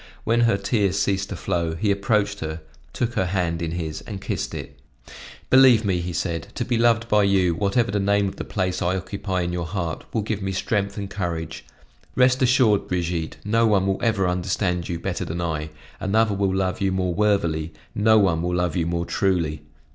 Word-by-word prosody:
When 115 +1 +2
her 115 -4 +3
tears 100 -1 0
ceased 100 0 0
to 95 - -4
flow, 85 -1 -2
he 100 +4 +1
approached 100 0 +1
her, 80 -1 -5 0.3
took 120 -1 -2
her 95 - 0
hand 85 -3 -1
in 85 -1 -2
his 80 -2 -4
and 100 -4 -5
kissed - - -3
it. - - -8 0.7
"Believe 130 -4 +7
me," 90 -2 -1
said 85 0 -2
he, - - -20
"to 120 - -3
be 120 - 0
loved 115 0 +3
by 105 -2 +4
you, 95 -3 +3
whatever 100 +6 +1
the 105 - 0
name 100 0 +2
of 95 - -6
the - - -4
place 95 -3 -2
I 90 +2 +1
occupy 95 0 -3
in 85 0 -2
your 85 -2 -3
heart, 85 -3 -3
will 110 - -1
give 105 -1 -3
me 95 0 -2
strength 100 +1 -1
and 100 -1 -3
courage. 85 -5 -4 0.5
Rest 130 +1 +4
assured, 125 -5 +3
Brigitte, 85 -2 -2
no 115 +2 +3
one 100 -3 +3
will 95 0 0
ever 110 -5 +1
understand 90 0 -1
you 85 - -2
better 90 +2 -3
than 85 0 -4
I; 80 -3 -2 0.3
another 110 +2 +2
will 100 -1 0
love 95 0 -1
you 95 -1 +2
more 90 -1 0
worthily, 85 -6 +1 0.2
no 110 +1 +4
one 90 -6 +3
will 90 +1 -1
love 90 -3 0
you 85 -2 0
more 85 0 -1
truly. 85 -7 0
95 Hz, 205 wpm, -23 LUFS, 85-105 Hz, 0.7 s, Believe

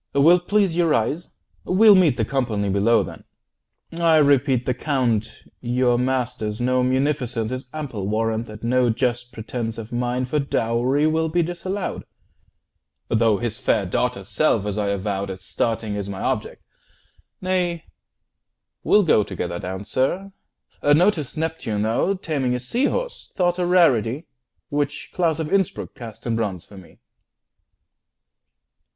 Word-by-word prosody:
Will't 170 +5 +4
please 200 -5 +2
you 175 -1 +2
rise? 150 +4 0 0.3
We'll 210 +3 +6
meet 175 -9 +4
The 110 - +1
company 110 -6 -1
below, 105 +4 +3
then. - - -9 0.7
I 165 -1 +3
repeat, 140 -4 +3
The 125 - +1
Count 120 -5 0 0.3
your 120 0 +1
master's 125 -4 -1
known 125 +1 +2
munificence 130 -4 0
Is 130 0 -5
ample 130 -11 -5
warrant 110 +2 -1
that 105 0 -11
no 125 +1 +2
just 120 +1 -1
pretence 115 0 -4
50 - - -5
Of - - 0
mine 125 +1 -1
for 150 +4 -1
dowry 130 +1 +1
will 160 +1 +1
be 175 +2 +2
disallowed; 175 +3 -4 1.0
Though 110 -2 +3
his 120 +1 -4
fair 110 -5 +1
daughter's 100 +1 -1
self, 115 -8 +1
as 105 -1 -2
I 105 -1 -1
avowed 100 0 -2
At 95 -1 -7
starting, 110 +1 -2
is 100 -1 -4
my 95 -1 -5
object. - - -2 0.8
Nay, 180 -3 -1 1.0
we'll 210 - +5
go 150 - +4
Together 85 -3 -4
down, 95 +2 -5
sir. 180 - -1 0.5
Notice 155 0 +2
Neptune, 155 -10 -2
though, 115 - +1
Taming 145 -9 -1
a - - -2
sea 235 - 0
horse, - - -3
thought 175 -1 +1
a 175 - +1
rarity, 150 - +3 0.4
Which 145 -1 -2
Claus 165 -3 +1
of 160 +1 -3
Innsbruck 195 -3 0
cast 115 -1 -10
in 115 -2 0
bronze 100 -6 -3
for 100 - -15
me! 90 - -17
125 Hz, 145 wpm, -22 LUFS, 110-160 Hz, 1.0 s, We'll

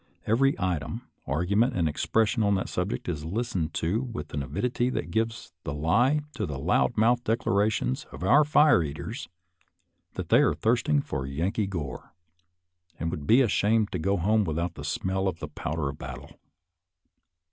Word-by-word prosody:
Every 135 +6 +3
item, 90 - -2 0.2
argument, 100 - +1
and 85 -3 +2
expression 110 - +1
on 100 -1 +3
that 95 - -2
subject 90 +6 -3
is 75 -4 -3
lis 110 +9 -3
tened 80 -4 -1
to 90 +8 0
with 115 - -6
an 70 - -1
avidity 120 - -1
that - - -3
gives 110 -3 -2
the 70 - -4
lie 115 - +2
to 105 - -3
the 75 - -4
loud 85 - +1
mouthed 120 +3 +3
declarations 105 - +1
of - - -8
our 140 +11 +6
fire 150 - +5
eaters, 75 +1 -5 0.9
that - - -5
they - - +6
are - - +3
thirsting 75 -1 +2
for 65 -1 -4
Yankee 95 +10 -1
gore, 80 -9 -6 0.8
and 85 0 -2
would 75 -5 -5
be 120 +4 +6
ashamed 110 -2 +2
to 90 - -2
go 100 +5 +1
home 105 +5 +2
without 85 0 -2
a - - -5
smell 95 +6 -1
of 90 -3 -2
the 75 - -6
powder 75 -1 -3
of 70 - -8
battle. - - -9
95 Hz, 170 wpm, -27 LUFS, 80-115 Hz, 0.9 s, our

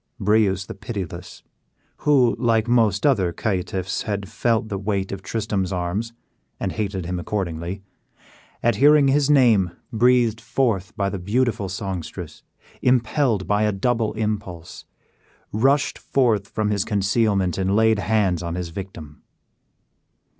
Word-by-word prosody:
Breuse 100 -2 +2
the - - -7
Pitiless, 95 -4 -7 0.5
who 130 -5 +3
like 115 -2 +2
most 115 -3 +2
other 100 -12 +3
caitiffs 95 0 -2
had 100 -2 -3
felt 115 +1 0
the 100 -2 -4
weight 100 -1 -2
of 100 -1 -5
Tristram's 100 -2 -2
arm, 90 +2 -1 0.6
and - - -2
hated 100 -4 -3
him 90 0 -3
accordingly, 90 0 -4 0.8
at 120 - +2
hearing 145 0 +6
his 145 +1 +2
name 120 -10 +4 0.2
breathed 120 -1 +3
forth 115 -5 0
by 100 -2 +1
the 100 - -4
beautiful 105 0 0
songstress, 95 -3 -6 0.4
impelled 125 -3 +2
by 105 0 +1
a 105 0 +2
double 115 +2 0
impulse, 105 -6 -4 0.7
rushed 135 +7 +1
forth 115 -7 +1
from 105 +1 -1
his 100 -2 +1
concealment 100 -3 +1
and 95 +1 +1
laid 110 -1 +3
hands 100 -5 +1
on 85 -1 -4
his 90 -2 -4
victim. 80 -5 -9
105 Hz, 130 wpm, -22 LUFS, 95-115 Hz, 0.8 s, hearing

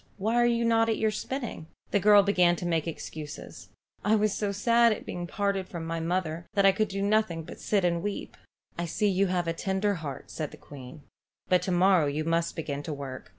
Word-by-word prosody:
"Why 215 +3 -1
are 240 0 +4
you 235 0 +1
not 225 0 +3
at 220 - +1
your 220 -1 +1
spinning?" 235 - -5 0.2
The 205 - +3
girl 205 0 +6
began 180 -3 +3
to 175 - -6
make 165 -2 0
excuses. 155 -2 -8 0.3
"I 215 +1 +3
was 215 -1 +2
so 205 -2 -1
sad 235 +3 +4
at 215 - -3
being 175 0 -5
parted 200 -1 -1
from 170 -2 -6
my 165 0 -3
mother 170 -1 -2
that 200 -1 +4
I 195 - +8
could 215 +2 0
do 195 0 -3
nothing 205 -5 +1
but - - -10
sit 200 -3 +1
and 170 -1 +1
weep." 205 +1 -5 0.4
"I 170 - -1
see 210 +6 0
you 195 +1 +2
have 180 -2 -1
a 165 - 0
tender 190 +4 0
heart," 140 -4 -7
said 155 -3 -4
the - - -13
Queen. 140 +1 -12 0.5
"But 180 -1 +4
to 185 - -2
morrow 180 -3 +4
you 145 +2 -1
must 165 +1 0
begin 145 -3 -4
to 155 - -6
work. 140 -2 -8
185 Hz, 225 wpm, -28 LUFS, 165-210 Hz, 0.5 s, I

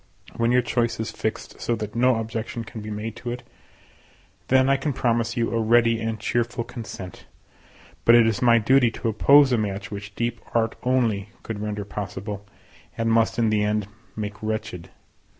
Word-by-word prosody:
When 115 0 +1
your 125 0 +4
choice 120 -1 0
is 110 - -3
fixed 110 - -5
so 120 - 0
that 105 -2 -5
no 125 +2 +3
objection 115 +1 -4
can 110 0 -8
be 105 - -7
made 105 +1 -5
to 120 - -6
it, 120 +1 -6 1.0
then 130 0 +4
I 135 - +4
can 135 +1 -2
promise 115 -1 0
you 115 -1 0
a 115 - +1
ready 115 0 +4
and 110 -1 -2
cheerful 120 +2 -1
consent; 115 -6 -9 0.8
but 115 - +7
it 120 -1 +7
is 110 -2 0
my 120 -2 +6
duty 125 +2 +4
to 115 - -3
oppose 140 +5 +6
a 120 - +3
match 100 -1 -3
which 100 0 -7
deep 120 0 -2
art 115 -1 +1
only 115 -6 +1
could 110 -2 -5
render 105 -1 -3
possible, 100 0 -5 0.5
and 115 0 +1
must 115 0 +2
in 115 -2 +2
the 105 -1 +2
end 105 -1 0 0.3
make 105 -1 -5
wretched. 110 -5 -4
115 Hz, 185 wpm, -24 LUFS, 105-120 Hz, 1.0 s, but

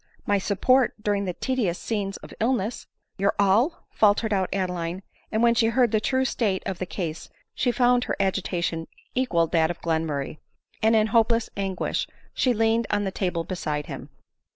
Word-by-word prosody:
my 205 -1 +2
support 240 +6 +2
during 205 -1 +1
the 180 - -2
tedi 255 -7 0
ous 170 - -3
scenes 200 -3 -3
of - - -12
illness 230 -1 -1
!" - - -52
" - - -51
Your 200 +1 +2
all 210 - +2
!" - - -48
faltered 215 +1 +4
out 190 -2 +1
Adeline; 180 -1 -2 0.3
and 220 +1 +1
when 235 0 +5
she 230 -1 +3
heard 235 0 +3
the 215 - +2
true 260 +2 +1
state 205 -7 0
of 190 -3 -3
the 185 - -3
case 170 -4 -5 0.2
she 250 - +1
found 245 0 +3
her - - -1
agitation 175 -4 -1 0.3
equal 250 -10 +2
led 165 - -3
that 160 -2 +3
of 175 - -5
Glenmurray, 160 -3 -2 0.4
and 220 +1 +4
in 215 -1 +4
hopeless 230 0 +2
anguish 195 -2 -2 0.3
she 255 - +2
leaned 225 0 +2
on 205 0 +1
the 195 - -2
table 180 -3 -1
beside 155 -4 -3
him. 135 -1 -8
200 Hz, 195 wpm, -25 LUFS, 180-230 Hz, 0.4 s, when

